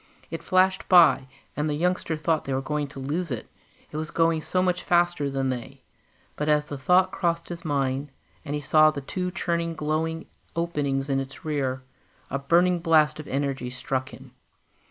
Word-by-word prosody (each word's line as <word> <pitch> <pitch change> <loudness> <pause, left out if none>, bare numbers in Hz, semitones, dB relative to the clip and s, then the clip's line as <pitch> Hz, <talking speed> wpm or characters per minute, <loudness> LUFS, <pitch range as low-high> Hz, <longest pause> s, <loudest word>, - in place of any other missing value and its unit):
It - - -4
flashed 185 0 +2
by, 170 -7 +6 0.3
and 150 +1 -1
the 150 - 0
youngster 170 0 0
thought 155 +1 0
they 135 - -1
were - - +1
going 150 +1 -2
to 135 - -10
lose 155 +6 -2
it 125 -5 -4 0.4
it 150 - -5
was 155 0 -3
going 165 -1 +2
so 180 +4 0
much 180 -1 +1
faster 175 -4 +2
than 135 -1 -1
they; 125 -2 -6 0.5
but 150 +1 -2
as 150 0 +3
the 145 - -4
thought 180 +7 +4
crossed 170 -1 -1
his 170 -1 -7
mind, 140 -2 -1 0.3
and 145 -2 -3
he 150 - -3
saw 155 +2 +5
the 145 -2 -4
two 180 +6 -3
churning 170 -2 -2
glowing 160 +2 -2 0.3
openings 145 -5 -1
in 135 -1 +1
its 135 +3 -7
rear, 135 -4 -1 0.5
a 140 - -1
burning 175 +5 +3
blast 155 -2 +3
of 155 - -8
energy 135 -2 -2
struck 130 +1 -3
him. - - -13
155 Hz, 185 wpm, -26 LUFS, 140-170 Hz, 0.5 s, by